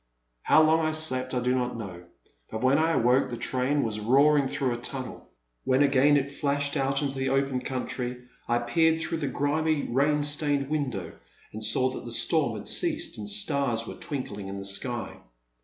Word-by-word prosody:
How 155 - +4
long 160 +1 +3
I 155 0 0
slept 130 -5 +1
I 125 - 0
do 125 +1 +1
not 125 -2 -2
know, 90 -5 -8 0.4
but 110 +2 -5
when 135 +3 +3
I 165 +1 +2
awoke, 125 0 +2
the 120 - -5
train 130 +4 0
was 110 -2 -3
roaring 140 +5 +3
through 130 -1 -2
a 120 - -6
tunnel. 130 0 -7 0.3
When 130 +2 +2
again 140 +1 +4
it 140 0 -2
flashed 145 0 -1
out 135 0 0
into 140 -1 -2
the 135 -1 -2
open 135 -1 0
country, 125 -1 -4 0.2
I 120 - +2
peered 160 +7 +2
through 160 0 -4
the 145 - -2
grimy 150 +3 0
rain 145 +4 +1
stained 145 -1 0
window 130 - -3 0.4
and 110 +1 -6
saw 130 +4 +2
that - - -8
the 120 - -7
storm 115 - +2
had - - -7
ceased - - +1
and 105 -1 -4
stars 115 +2 +2
were - - -7
twinkling 105 -8 -5
in 100 0 -6
the 100 - -7
sky. 120 +4 -3
130 Hz, 190 wpm, -26 LUFS, 120-145 Hz, 0.4 s, How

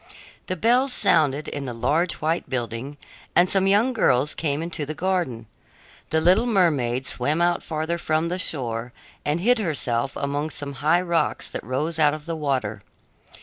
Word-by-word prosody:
Then 185 - -2
bells 250 - +3
sounded 150 - +2
in 140 -1 -5
the 120 -2 -5
large 150 +9 +1
white 160 +3 -2
building, 125 +3 -4 0.4
and 175 +1 +6
some 195 0 +2
young 215 +6 +3
girls 145 - +2
came 150 -1 -2
into 165 -3 -3
the 155 +2 -5
garden. 175 -12 -1 0.6
The 160 - +2
little 185 +9 +4
mermaid 140 - +1
swam 145 +7 -1
out 175 0 +2
farther 160 +2 -3
from 155 0 0
the 180 +2 -3
shore 120 -7 -4 0.3
and 150 +3 -1
hid 245 +4 +3
herself 140 - -1
among 145 +2 -2
some 145 -2 -5
high 165 +4 +3
rocks 170 -2 0
that - - -5
rose 150 +7 -2
out 150 -1 +4
of 150 -1 -10
the 165 -1 -3
water. 130 -9 -2
155 Hz, 170 wpm, -24 LUFS, 135-175 Hz, 0.6 s, and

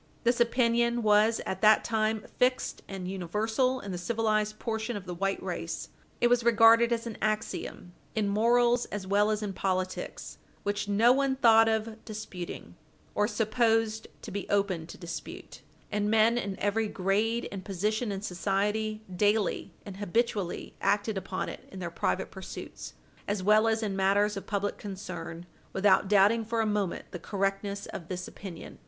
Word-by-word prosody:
This 240 0 +2
opinion 235 0 +2
was 215 +1 +4
at 190 - -4
that 215 0 +6
time 220 -1 0
fixed 255 0 +1
and 190 -2 -6
universal 220 +8 0
in 200 - -6
the 180 - -4
civilized 215 0 0
portion 220 0 -3
of 190 - -8
the 180 - -5
white 195 +3 -1
race. - - -4 0.3
It - - +3
was 245 0 +3
regarded 230 0 +6
as 235 0 0
an 230 -2 -6
axiom 215 -4 -3 0.2
in 215 -2 +1
morals 240 +3 +3
as 205 -2 -5
well 205 +2 +3
as 215 0 -1
in 200 -2 -3
politics 185 0 -3 0.2
which 205 0 -1
no 225 +5 +5
one 275 0 +1
thought 225 -3 +6
of 220 0 -2
disputing 210 -5 -7 0.4
or 210 - +2
supposed 225 -1 +1 0.2
to - - -7
be 200 0 -5
open 195 -5 0
to - - -10
dispute, 165 -4 -8 0.3
and 210 0 0
men 220 +1 +4
in 200 -5 -3
every 215 +2 +1
grade 210 +5 0
and 195 -1 -6
position 210 +4 -1
in 195 0 -4
society 210 +3 -1
daily 205 +2 +1
and 195 -2 -8
habitually 205 -1 -1
acted 205 +2 +1
upon 190 -1 -3
it - - -9
in 195 - -9
their 175 -2 -4
private 190 +2 -1
pursuits, 190 -1 -8 0.3
as 205 -2 -1
well 215 +3 +5
as 225 0 +1
in 200 -3 -2
matters 200 +2 +2
of 195 - -7
public 205 -1 -2
concern, 175 -4 -7 0.3
without 190 0 +4
doubting 210 +3 +4
for 230 +1 -2
a 225 - +2
moment 205 -4 -1
the 175 - -6
correctness 200 +2 -2
of 170 - -8
this 180 0 -4
opinion. 180 -5 -9
210 Hz, 165 wpm, -29 LUFS, 195-225 Hz, 0.4 s, that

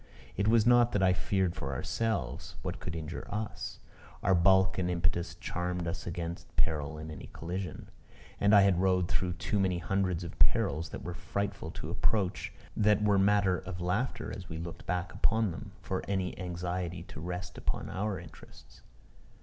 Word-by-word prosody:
It 100 +2 +1
was 115 -1 +5
not 120 0 +6
that 100 - +2
I 90 -1 +6
feared 95 -1 +1
for 70 -1 -3
ourselves. 110 - -2
What - - -3
could 85 - -5
injure 80 0 -5
us? 105 +1 -4 0.4
Our 95 - +4
bulk 95 +2 +5
and 90 -1 +1
impetus 85 0 0
charmed 90 0 -2
us 85 - -4
against 85 0 -5
peril 75 -2 0
in 80 +1 -6
any 75 - -8
collision. 90 +3 -4 0.5
And 100 +1 +6
I 100 - +9
had 95 -2 +4
rode 90 -2 +3
through 90 -1 0
too 85 +4 -1
many 95 -2 +2
hundreds 90 -1 0
of 85 - -8
perils 80 +2 +3
that - - -7
were 90 - -4
frightful 95 +3 -3
to - - -4
approach, 100 -4 0 0.2
that 105 -1 +4
were 100 -2 +4
matter 95 -2 +4
of 95 -2 -6
laughter 110 +7 -1
as 95 -3 -9
we 80 - -4
looked 85 +1 -7
back 90 0 -1
upon 110 -3 +2
them, 100 +4 -7
for 95 - -1
any 95 -2 -1
anxiety 90 -1 -3
to - - -10
rest 90 +3 -4
upon - - -2
our 100 -1 -2
interests. 85 -3 -14
90 Hz, 175 wpm, -31 LUFS, 85-100 Hz, 0.5 s, I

